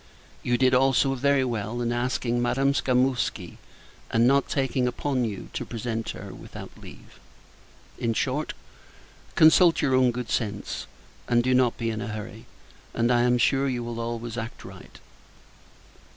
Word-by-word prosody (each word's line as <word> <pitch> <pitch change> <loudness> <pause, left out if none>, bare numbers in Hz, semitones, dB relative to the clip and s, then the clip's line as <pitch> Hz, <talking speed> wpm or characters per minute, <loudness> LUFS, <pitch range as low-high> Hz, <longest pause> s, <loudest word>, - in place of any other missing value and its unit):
You 120 -1 +1
did, 130 0 +3
also, 135 +1 +3
very 140 +1 +2
well, 115 -1 -3
in 120 -1 -1
asking 120 0 -1
Madame 135 +3 +1
Skamouski; 130 -1 0 0.5
and 115 +1 +3
not 140 +2 +3
taking 135 -2 0
upon 130 0 -1
you 105 -4 -6
to - - -3
present 115 -1 -4
her, - - -7
without - - -10
leave. - - -14 0.8
In 115 -1 -1
short, 140 +6 -1 0.8
consult 165 +2 +6
your 135 -3 +1
own 130 -1 +4
good 120 -2 -4
sense, 105 -3 -3 0.4
and 120 -1 +3
do 130 +1 +2
not 125 -2 +3
be 115 -1 -2
in 110 -1 -4
a - - -4
hurry; 110 0 -7 0.5
and, 120 +1 +2
I 120 -1 +4
am 125 0 +3
sure, 135 +3 +2
you 120 -2 -2
will 120 0 -5
always 115 0 -4
act 115 +1 -7
right. - - -12
125 Hz, 155 wpm, -26 LUFS, 115-130 Hz, 0.8 s, consult